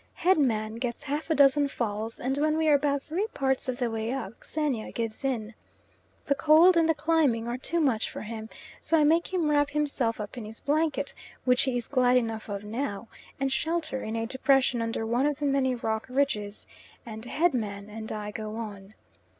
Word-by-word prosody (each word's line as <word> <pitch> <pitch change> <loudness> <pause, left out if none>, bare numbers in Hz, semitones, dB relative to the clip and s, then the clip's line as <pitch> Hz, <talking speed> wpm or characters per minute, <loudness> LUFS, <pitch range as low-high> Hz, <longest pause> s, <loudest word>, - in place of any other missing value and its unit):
Head 365 -1 +3
man 220 -5 0
gets 240 -1 -3
half 295 +3 -3
a 320 - +3
dozen 285 0 +5
falls, 225 -4 -3
and 260 +2 -1
when 310 +1 +2
we 320 0 +1
are 300 - +6
about 285 -1 +2
three 365 +7 -2
parts 265 -1 0
of 250 - -2
the 245 -3 -1
way 225 +1 -2
up 240 -5 -5
Xenia 290 -8 -2
gives 225 +2 -3
in. 235 -5 -2 0.7
The 280 - +3
cold 320 +5 +6
and 330 -1 +3
the 325 - +3
climbing 295 -7 +2
are 240 +1 -3
too 340 +6 0
much 260 -8 +1
for - - -7
him, 220 0 -7 0.3
so 330 - +2
I 305 - +4
make 330 +5 +3
him 355 -4 +1
wrap 290 -1 +3
himself 280 -7 0
up 210 +3 -6
in 220 - -7
his 220 +1 -10
blanket, 310 +1 0 0.3
which 250 -1 +4
he 260 -2 0
is 240 - -3
glad 255 -2 +3
enough 225 -3 -2
of 200 0 -4
now, 225 0 -4 0.3
and 270 0 0
shelter 315 -2 -1
in 220 - -4
a 225 0 -1
depression 260 0 +2
under 230 -1 -2
one 240 +5 +1
of 295 -2 -1
the 295 - -3
many 270 -2 +2
rock 220 -2 -2
ridges, 215 -6 -1 0.4
and 220 -1 -8
Head 320 +6 +1
man 205 -4 -3
and 220 +1 -7
I 210 -1 -4
go 215 0 -5
on. 210 -2 -7
255 Hz, 205 wpm, -28 LUFS, 225-295 Hz, 0.7 s, are